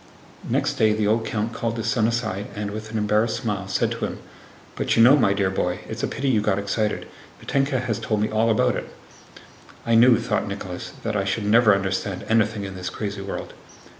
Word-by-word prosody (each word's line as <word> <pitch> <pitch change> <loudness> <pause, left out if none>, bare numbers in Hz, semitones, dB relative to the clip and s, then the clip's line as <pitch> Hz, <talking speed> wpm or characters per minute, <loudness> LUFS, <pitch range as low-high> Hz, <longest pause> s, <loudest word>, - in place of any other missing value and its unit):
Next - - 0
day 110 -1 +4
the 105 0 0
old 110 +2 +1
count 115 0 -2
called 115 0 -2
his 115 - -3
son 115 -1 +2
aside 110 -4 -2
and, 105 0 -3
with 110 +1 -6
an 110 - -3
embarrassed 105 +2 +1
smile, 105 -5 -3
said 95 - 0
to - - -2
him: - - -5 0.6
"But - - 0
you 115 - +7
know, 130 +4 +8
my 120 -9 +3
dear 100 -2 0
boy, 90 -1 -1
it's 110 +1 -5
a - - 0
pity 135 +3 -3
you 115 -5 +3
got 105 -2 +1
excited! 105 +2 -1 0.3
Mítenka 135 -1 0
has 115 -4 -2
told 110 -2 -1
me 105 - +1
all 110 +1 +2
about 105 - +2
it." - - -5 1.0
"I 115 - +1
knew," 115 +1 +7
thought - - -1
Nicholas, - - -6
"that 110 -1 -2
I 100 - +1
should 100 +2 -2
never 105 0 +5
understand 95 -1 -2
anything 110 -2 +1
in 95 -1 -6
this 90 0 -4
crazy 100 -2 -5
world." 100 - -6
110 Hz, 215 wpm, -23 LUFS, 100-115 Hz, 1.0 s, know